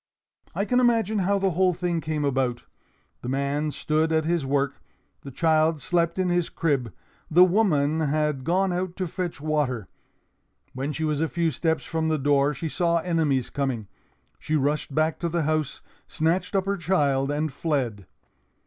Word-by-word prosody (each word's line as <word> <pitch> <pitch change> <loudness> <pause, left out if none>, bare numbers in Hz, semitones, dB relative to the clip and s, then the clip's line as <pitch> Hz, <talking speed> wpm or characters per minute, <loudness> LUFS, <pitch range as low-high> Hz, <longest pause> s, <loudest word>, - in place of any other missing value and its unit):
"I 200 - 0
can 250 +3 +2
imagine 225 -4 +2
how 200 +2 +2
the 195 -1 +1
whole 180 +1 +2
thing 175 -2 -1
came 155 -2 -2
about. 130 -3 0 0.6
The 125 - -5
man 140 +3 -1
stood 155 +2 0
at 160 -1 +2
his 165 -4 0
work; 140 0 0 0.4
the 140 - -9
child 155 +2 +2
slept 170 +2 0
in 185 -1 +1
his 175 -1 +1
crib; 140 -9 -1 0.4
the 175 +3 +7
woman 165 -6 +2
had 150 -2 0
gone 185 +4 +1
out 180 0 -3
to 185 - -2
fetch 175 -2 -4
water. 145 - -1 0.9
When 135 +3 -3
she 160 +2 -3
was 150 -1 0
a 160 - +2
few 170 -1 0
steps 160 -2 -1
from 160 -1 -1
the 160 -1 +1
door, 140 0 +2
she 165 - -4
saw 170 +1 +1
enemies 160 -7 0
coming. 130 -7 -2 0.5
She 155 - -2
rushed 145 -1 0
back 155 +1 +1
to 170 - -1
the 170 0 0
house, 155 -2 -1 0.3
snatched 175 +5 0
up 190 -1 +2
her 200 0 -1
child, 145 -6 +1
and 150 0 -1
fled. 125 - -2
155 Hz, 175 wpm, -25 LUFS, 140-175 Hz, 0.9 s, the